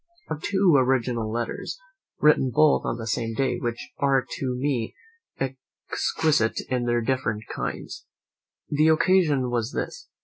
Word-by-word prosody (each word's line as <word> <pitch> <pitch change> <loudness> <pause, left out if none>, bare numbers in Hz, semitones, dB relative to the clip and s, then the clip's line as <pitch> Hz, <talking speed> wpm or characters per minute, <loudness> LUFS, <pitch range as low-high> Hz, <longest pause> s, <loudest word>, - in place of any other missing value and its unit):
I - - -2
have 150 - -7
two 190 -2 +3
original 125 -4 +1
letters, 120 - -4 0.4
written 150 -3 +4
both 150 +5 +4
on 115 - -1
the 115 - -6
same 115 0 -2
day, 125 -1 0
which 120 -1 -4
are 135 -2 +2
to 130 -2 -2
me 125 -3 -1 0.4
exquisite 135 0 -1
in 125 -1 0
their 120 0 +1
different 115 -3 -1
kinds. - - -5 0.6
The 150 +2 +3
occasion 155 -6 +3
was 120 0 -1
this. 390 - -4
130 Hz, 140 wpm, -25 LUFS, 120-145 Hz, 0.6 s, written